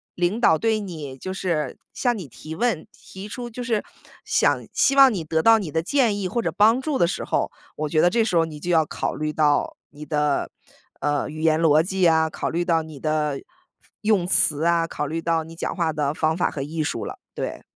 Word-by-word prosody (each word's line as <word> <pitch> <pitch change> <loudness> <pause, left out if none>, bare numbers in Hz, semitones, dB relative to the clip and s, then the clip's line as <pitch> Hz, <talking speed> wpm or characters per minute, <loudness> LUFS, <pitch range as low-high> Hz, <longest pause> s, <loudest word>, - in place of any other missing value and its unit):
领 175 +5 0
导 160 -9 +4
对 220 +3 +1
你 155 -9 -7
就 185 +7 -5
是 165 -7 -2 0.2
向 245 -2 0
你 185 - -6
提 155 +7 -9
问， 220 -5 -1
提 195 +2 -11
出 240 +3 -6
就 240 +2 -7
是 230 -3 -1 0.4
想 - - +1
希 275 - +2
望 270 -3 +7
你 190 - -2
得 160 +1 +1
到 225 +5 +6
你 190 -6 -5
的 160 +2 0
建 235 - +2
议 190 -2 -2
或 235 +5 -1
者 170 - -1
帮 220 +6 +4
助 280 +1 -2
的 175 - +4
时 170 - -3
候， - - -1 0.2
我 155 0 -3
觉 155 - +1
得 175 - +5
这 230 +4 +2
时 185 -6 0
候 165 - +4
你 155 -2 -8
就 175 - -2
要 160 -2 +4
考 - - -3
虑 155 0 -3
到 150 -2 +1
你 150 +1 -11
的， 150 -2 0 0.5
呃， 145 0 0
语 155 +1 -7
言 160 -1 +3
逻 155 -1 +4
辑 185 0 +1
啊， 160 -1 +3
考 - - -3
虑 170 +2 -1
到 165 -2 +1
你 155 -2 -11
的 150 -1 -1 0.6
用 210 -4 +2
词 155 -4 +3
啊， 170 -1 +3
考 150 - -4
虑 160 +3 -3
到 165 -1 0
你 165 +1 -12
讲 - - -4
话 170 -3 0
的 150 -2 -1
方 160 +1 0
法 180 - +1
和 140 - -5
艺 155 +3 -3
术 - - -3
了， - - -7 0.2
对。 - - -5
165 Hz, 245 characters per minute, -23 LUFS, 155-205 Hz, 0.6 s, 望